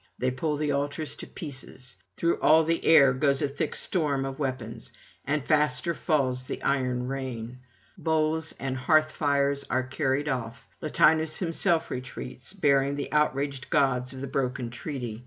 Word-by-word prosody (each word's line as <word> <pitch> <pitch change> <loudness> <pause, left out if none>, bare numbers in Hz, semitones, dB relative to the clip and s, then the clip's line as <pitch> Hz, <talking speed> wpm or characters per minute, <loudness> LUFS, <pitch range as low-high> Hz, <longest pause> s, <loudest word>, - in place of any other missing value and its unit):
They 130 0 0
pull 150 +4 -2
the 150 0 0
altars 145 +2 -1
to - - -7
pieces; 130 -5 -7 0.2
through 170 0 +1
all 160 +1 +6
the 165 +1 0
air 140 -5 +7
goes 140 +2 +1
a - - +2
thick 140 +1 -2
storm 145 -7 +1
of 135 +1 -6
weapons, 125 -5 -4 0.3
and 145 -1 0
faster 150 +2 +2
falls 130 -7 0
the - - -5
iron 125 -2 0
rain. 125 -3 -5 0.4
Bowls 160 0 +1
and 135 -1 -2
hearth 155 +4 +3
fires 140 -2 +1
are 130 +1 +1
carried 135 +2 -1
off; 120 -5 -3 0.2
Latinus 155 +1 +3
himself 170 -1 0
retreats, 125 +2 -7
bearing 140 -6 +2
the 140 - -4
outraged 140 -3 0
gods 135 -5 +2
of 130 -1 -8
the - - -3
broken 130 -2 -2
treaty. 120 -4 -5
140 Hz, 155 wpm, -27 LUFS, 130-155 Hz, 0.4 s, air